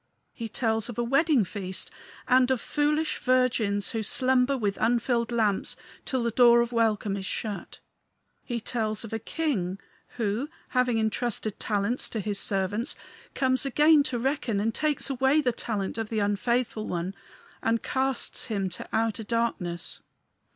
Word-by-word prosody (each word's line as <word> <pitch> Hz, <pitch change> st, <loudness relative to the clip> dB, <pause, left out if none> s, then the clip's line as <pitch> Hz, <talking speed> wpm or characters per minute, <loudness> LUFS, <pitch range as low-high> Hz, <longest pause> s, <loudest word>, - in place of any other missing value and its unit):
He 230 Hz, -2 st, -6 dB
tells 225 Hz, 0 st, 0 dB
of 240 Hz, -, -7 dB
a 240 Hz, -, +1 dB
wedding 275 Hz, -, +3 dB
feast, 185 Hz, 0 st, -3 dB, 0.4 s
and 255 Hz, 0 st, +5 dB
of 260 Hz, -2 st, +2 dB
foolish 300 Hz, +3 st, 0 dB
virgins 235 Hz, -6 st, +1 dB
who 225 Hz, -, -2 dB
slumber 255 Hz, +4 st, +3 dB
with 205 Hz, -5 st, -1 dB
unfilled 235 Hz, +1 st, +1 dB
lamps 215 Hz, -4 st, +1 dB, 0.3 s
till 260 Hz, -3 st, -1 dB
the 235 Hz, -, 0 dB
door 235 Hz, 0 st, +6 dB
of 235 Hz, 0 st, -1 dB
welcome 220 Hz, -3 st, +1 dB
is 195 Hz, -1 st, -5 dB
shut. 210 Hz, -3 st, -4 dB, 0.7 s
He 240 Hz, -2 st, -3 dB
tells 220 Hz, -1 st, -2 dB
of 225 Hz, -, -7 dB
a 225 Hz, -, -1 dB
king, 205 Hz, -, -2 dB, 0.4 s
who, 225 Hz, +5 st, -1 dB, 0.2 s
having 250 Hz, -2 st, +2 dB
intrusted 220 Hz, -1 st, -1 dB
talents 210 Hz, +4 st, 0 dB
to 225 Hz, -, -3 dB
his 205 Hz, 0 st, -1 dB
servants, 200 Hz, +4 st, 0 dB, 0.4 s
comes 260 Hz, -1 st, +2 dB
again 300 Hz, +3 st, +5 dB
to 255 Hz, -3 st, -1 dB
reckon, 240 Hz, -4 st, -1 dB
and 220 Hz, +2 st, 0 dB
takes 305 Hz, +2 st, 0 dB
away 265 Hz, +3 st, +3 dB
the 260 Hz, -5 st, +2 dB
talent 215 Hz, -1 st, -3 dB
of 220 Hz, -1 st, -3 dB
the 225 Hz, -, -2 dB
unfaithful 215 Hz, +2 st, 0 dB
one 175 Hz, +2 st, -3 dB, 0.5 s
and 230 Hz, 0 st, 0 dB
casts 265 Hz, -1 st, 0 dB
him 200 Hz, -5 st, -1 dB
to 175 Hz, -, -6 dB
outer 225 Hz, -1 st, 0 dB
darkness. 215 Hz, -7 st, -2 dB
230 Hz, 155 wpm, -27 LUFS, 210-255 Hz, 0.7 s, door